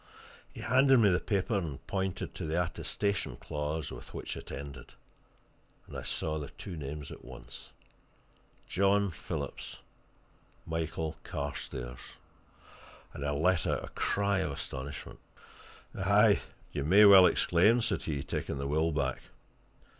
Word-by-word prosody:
He - - -9
handed 130 +3 +5
me 110 -4 +6
the 90 - +3
paper 100 +2 0
and 80 -8 -3
pointed 95 -2 -2
to - - -5
the 80 +3 +1
attestation 95 - -1
clause 75 +3 -3
with - - -10
which - - -5
it - - -9
ended. 70 -1 -8 0.9
And - - -11
I - - -3
saw 80 -1 -2
the 70 - -6
two 90 - -8
names 75 -1 -6
at - - -10
once 65 -1 -10 1.0
John 100 +1 +3
Phillips, 75 -3 -5 0.9
Michael 80 -1 -3
Carstairs 60 -1 -5 1.1
and 70 - -6
I 70 - 0
let 80 +4 +2
out - - 0
a - - -11
cry 100 -1 +1
of 80 - -1
astonishment. 70 +1 -6 0.8
"Aye, 100 +2 +4 0.3
you 70 - -2
may 100 +8 +7
well 95 -2 +10
exclaim!" 105 +8 +4
said 100 -6 0
he, 70 -4 -3
taking - - -3
the 70 - -3
will 80 +3 +1
back. 70 -4 -1
80 Hz, 140 wpm, -31 LUFS, 70-100 Hz, 1.1 s, well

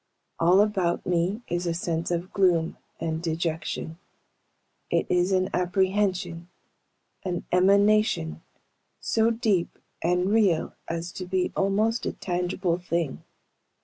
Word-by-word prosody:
All 180 +4 +5
about 190 -5 0
me 180 +6 0
is 175 +1 -2
a 165 - 0
sense 165 -1 -2
of 175 +2 -3
gloom 175 -4 +2 0.2
and 160 -1 -2
dejection. 160 0 -3 0.9
It - - +1
is 180 +1 +2
an 185 0 +1
apprehension 185 -2 0 0.7
an 180 -2 -3
emanation 200 - +3 0.6
so 225 0 +2
deep 220 -6 0 0.2
and 180 +3 +1
real 200 -7 +2
as 170 +1 -4
to 185 0 -7
be 185 0 0
almost 215 +4 +1
a - - -2
tangible 180 -1 -1
thing. 170 -5 -2
180 Hz, 115 wpm, -26 LUFS, 170-195 Hz, 0.9 s, All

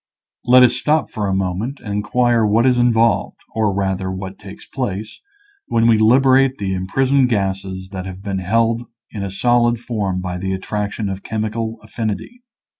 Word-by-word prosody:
Let 125 +1 +7
us 125 -1 +5
stop 155 +4 0
a 105 -2 -1
moment 95 +8 -2
and 105 -3 -6
inquire 115 +3 +1
what 110 +3 +3
is 125 -1 +3
involved, 115 -1 +2 0.2
or 110 -2 +1
rather 95 -1 -1
what 95 +1 -7
takes 100 -1 -11
place, 110 -5 -5 0.5
when 115 0 +2
we 115 -2 +5
liberate 130 +3 +4
the 95 -1 -2
imprisoned 130 +8 +1
gases 95 -3 -2
that 95 -1 -6
have 95 +1 -9
been 100 -2 -2
held 115 +5 +1 0.3
in 105 - -6
a 100 - -3
solid 120 +4 +2
form 105 -6 -2
by 90 -1 -4
the 95 +1 -2
attraction 105 +2 -3
of 95 0 -4
chemical 110 +1 -3
affinity. 115 - -5
110 Hz, 165 wpm, -19 LUFS, 95-120 Hz, 0.5 s, Let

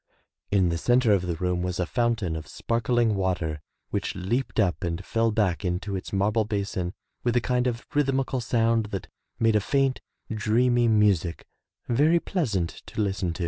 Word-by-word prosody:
In 95 -3 +3
the 85 0 -1
center 120 +1 +4
of 90 -2 +1
the 85 - -1
room 90 +1 -1
was 90 0 -2
a 90 - +1
fountain 115 -5 0
of 80 - -6
sparkling 115 -1 +1
water 90 -6 -1 0.3
which - - -2
leaped 115 +8 -1
up 95 -4 +1
and 85 +2 -3
fell 115 0 +1
back 105 -5 0
into 95 +2 -2
its 95 - -5
marble 105 +3 +2
basin 100 -4 -3 0.3
with 120 -1 +1
a - - +5
kind 125 +1 0
of 120 -1 -3
rhythmical 135 -3 +1
sound 115 -1 +1
that 100 -3 -5 0.3
made 115 -1 +3
a 105 - +4
faint, 135 +4 +1 0.3
dreamy 120 +3 +2
music 100 -6 +2 0.4
very 150 +8 +4
pleas 165 - -1
ant 85 -3 -2
to - - -7
listen 95 -4 0
to. 85 - -10
105 Hz, 180 wpm, -26 LUFS, 90-120 Hz, 0.4 s, a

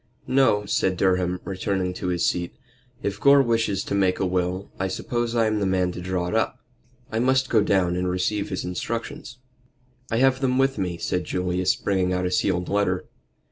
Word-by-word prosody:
"No," 130 -6 +3
said 95 -2 0
Durham, 90 -1 +1
returning 95 -1 -2
to 90 - -5
his 90 -1 0
seat. 85 -1 -1 0.5
"If 100 0 -2
Gore 140 +2 +6
wishes 115 -5 0
to - - -4
make 95 -2 +2
a - - +1
will, 90 +1 -2
I 95 - 0
suppose 120 +4 -2
I 115 -1 +3
am 110 -1 +1
the 100 - 0
man 90 -1 +1
to 90 - -7
draw 90 -1 -2
it 90 - -3
up. 110 - 0 0.5
I 110 - -1
must 130 +2 +2
go 110 - +5
down 95 -3 +2
and 90 0 -1
receive 95 +3 -1
his - - -3
instructions." 115 +6 -5 0.7
"I 115 - 0
have 130 +1 +3
them 130 -1 +1
with 135 -3 +2
me," 90 -3 -2
said 90 +1 -2
Julius, 90 0 0
bringing 95 -2 0
out 90 0 0
a 90 - -1
sealed 90 -1 0
letter. 100 -3 0
95 Hz, 195 wpm, -24 LUFS, 90-115 Hz, 0.7 s, Gore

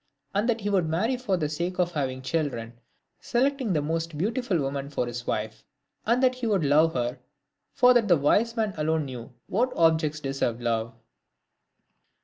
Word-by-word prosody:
Arid 205 +3 +1
that 230 -1 0
he 205 - -1
would 180 -5 +2
marry 210 +11 +1
for 215 -7 -1
the 155 -3 -1
sake 170 +4 -3
of 175 -1 +1
having 130 -4 -3
children, 130 -6 -2 0.5
selecting 260 -2 0
the 150 -3 +1
most 165 0 -2
beautiful 215 - 0
woman 140 -1 -3
for 140 -3 -1
his 120 0 -6
wife. 110 +1 -3 0.4
And 240 +3 +3
that 255 -1 +5
he 250 -2 -4
would 200 -6 +2
love 155 +3 +4
her; 120 0 -2 0.5
for 250 0 +5
that 235 -3 +3
the 175 -4 +5
wise 215 +11 +2
man 215 -3 0
alone 155 0 0
knew 125 -1 -8
what 245 +6 0
objects 160 -2 +2
deserved 135 -4 -2
love. 115 -1 -1
160 Hz, 175 wpm, -26 LUFS, 135-215 Hz, 0.5 s, that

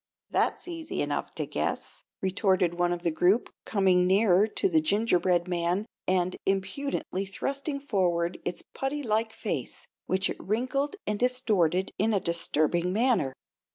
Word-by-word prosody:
"That's - - 0
easy 330 -2 -3
enough - - -3
to - - -2
guess," - - -3 0.2
retorted 190 -2 +2
one 175 0 +1
of 175 0 -3
the 170 - +1
group, 180 +8 +2
coming 185 -3 +3
nearer 195 +1 +4
to 305 - 0
the 325 -4 +3
gingerbread 185 - +2
man 175 +3 0 0.2
and 185 -1 +1
impudently 195 +1 -1
thrusting 275 +8 -3
forward 180 -9 0
its 180 - -4
putty 280 +2 -2
like 220 -1 0
face, - - -4 0.2
which 190 0 +1
it - - -5
wrinkled 260 - -1
and 210 -1 -1
distorted 205 -8 +1
in 215 +2 +2
a - - +3
disturbing 170 0 0
manner. 210 - +2
195 Hz, 145 wpm, -28 LUFS, 180-240 Hz, 0.2 s, nearer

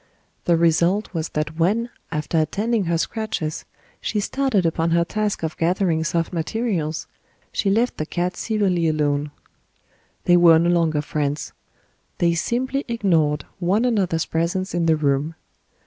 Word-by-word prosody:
The 170 -1 +4
result 170 +5 +2
was 165 -1 -2
that 150 +1 -3
when, 225 +8 +1 0.2
after 150 +1 0
attending 205 +7 0
her 170 0 +1
scratches, 165 -5 -3 0.4
she 210 - -1
started 225 -3 0
upon 165 0 +1
her 170 0 +3
task 210 0 -2
of 160 - -2
gathering 170 -1 +1
soft 165 +2 -1
materials, 165 -3 -2 0.5
she 200 - 0
left 230 +5 +1
the 155 - -3
cat 180 +1 -2
severely 195 -6 0
alone. 150 -1 0 0.9
They 175 - +5
were 170 -2 +7
no 170 +2 +3
longer 160 -4 +1
friends; 150 -1 -2 0.6
they 170 -1 +2
simply 255 - -1
ignored 165 - +1
one 195 +6 +2
another's 190 -9 +1
presence 175 +4 -1
in 170 -1 +1
the 160 - +5
room. 150 +1 0
170 Hz, 145 wpm, -22 LUFS, 160-200 Hz, 0.9 s, were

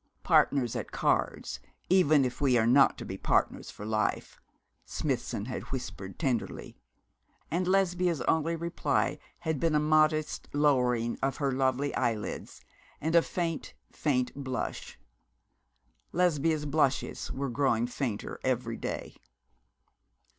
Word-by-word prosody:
'Partners 125 -5 +3
at - - -4
cards, - - 0 0.3
even 155 -7 +5
if 125 +1 -4
we 130 -4 +4
are 110 - +3
not 135 +4 +5
to - - -7
be 95 0 -6
partners - - +1
for 105 - -9
life,' 110 0 -1 0.4
Smithson 100 - -2
had 125 - -4
whispered, 110 -7 -5
tenderly; 130 -8 -2 0.8
and 180 +3 0
Lesbia's 180 -3 +2
only 160 +1 +1
reply 170 +1 -1 0.2
had 160 -3 -1
been 165 0 +2
a - - +5
modest 155 0 +2
lowering 125 -5 +2
of 135 +3 -1
lovely 135 0 +1
eyelids, 115 -4 -2 0.4
and 160 +2 -1
a 170 - +8
faint, 165 - -3 0.2
faint 125 -4 0
blush. 130 -3 -5 1.1
Lesbia's 160 -3 +1
blushes 145 -2 0
were 135 0 -3
growing 120 -3 +2
fainter 120 -3 -4
every - - -1
day. - - -5
140 Hz, 120 wpm, -29 LUFS, 125-160 Hz, 1.1 s, a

